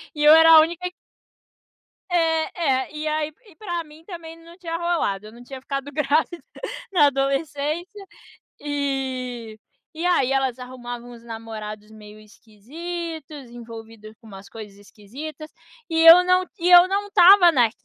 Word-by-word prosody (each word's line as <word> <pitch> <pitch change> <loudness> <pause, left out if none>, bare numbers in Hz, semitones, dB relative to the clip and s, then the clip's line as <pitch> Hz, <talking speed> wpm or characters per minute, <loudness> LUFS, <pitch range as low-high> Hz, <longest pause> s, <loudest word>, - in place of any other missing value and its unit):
e 295 - -2
eu 300 +1 +8
era 325 0 +7
a 315 - +9
única 345 +3 -3 1.2
É, 330 -1 0 0.2
é. - - -20
E 305 +1 -4
aí 305 0 -2
e 400 -6 -19
pra 350 -3 -5
mim 310 +1 -17
também 335 -3 -10
não 335 +1 -16
tinha 335 -3 -5
rolado, 330 - -2
eu - - -13
não 240 +2 -15
tinha 265 +1 -10
ficado 275 +1 -5
grávida 305 +3 -1 0.5
na 340 -6 +4
adolescência. 290 +7 -3 0.5
E 260 -5 -4 0.4
e 330 +2 -4
aí 275 -8 +1
elas 265 -2 0
arrumavam 245 -1 -9
uns 235 -1 -14
namorados 220 -2 -9
meio 215 -1 -14
esquisitos, 290 - -9
envolvido 225 -2 -12
com 230 - -22
umas 195 -1 -13
coisas 210 -3 -11
esquisitas, 275 +10 -11 0.4
e 325 -1 -1
eu 335 +2 +9
não 365 0 +2
e 345 +1 0
eu 355 0 +8
não 400 +2 -2
estava 370 -2 +6
na 245 -7 +3
290 Hz, 150 wpm, -22 LUFS, 235-335 Hz, 1.2 s, a